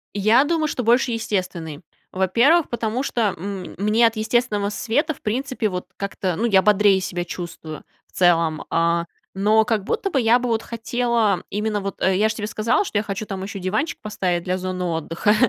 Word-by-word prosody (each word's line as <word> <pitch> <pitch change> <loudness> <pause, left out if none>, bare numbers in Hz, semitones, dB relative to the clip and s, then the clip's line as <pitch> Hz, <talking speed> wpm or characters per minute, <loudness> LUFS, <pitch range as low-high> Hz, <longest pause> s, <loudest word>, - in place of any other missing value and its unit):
Я 215 +6 +4
думаю, 315 +1 0
что 250 - -3
больше 240 +2 +3
естественный. 180 -8 -3 0.3
Во-первых, 235 - +3
потому 235 +1 -2
что, 225 -7 0
м, 195 +1 -6
мне 215 +4 +3
от 225 - -3
естественного 215 -2 0
света, 260 +9 -1
в - - -21
принципе, 250 +1 -1
вот 180 -1 -4
как-то, 195 -3 -3
ну, 225 - -1
я 195 -5 +4
бодрее 205 -1 +4
себя 175 -2 -3
чувствую 170 -3 -7 0.2
в - - -35
целом. 165 -3 +3
А, 170 0 +1 0.3
но 215 +3 +3
как 215 -2 0
будто 390 - -1
бы 285 - +1
я 235 0 +4
бы 250 -1 -2
вот 225 -1 0
хотела, 230 -3 0
именно 210 +1 -1
вот, 195 0 -6
э, 190 0 +3
я 215 +2 +3
ж - - -1
тебе 210 -1 -4
сказала, 220 - +1
что 215 - -2
я 205 - +1
хочу 205 0 -4
там 190 -1 -5
еще 195 0 -6
диванчик 205 - -2
поставить 185 -5 -2
для 185 0 0
зоны 185 0 -4
отдыха, 165 +5 0
210 Hz, 195 wpm, -22 LUFS, 185-230 Hz, 0.3 s, Я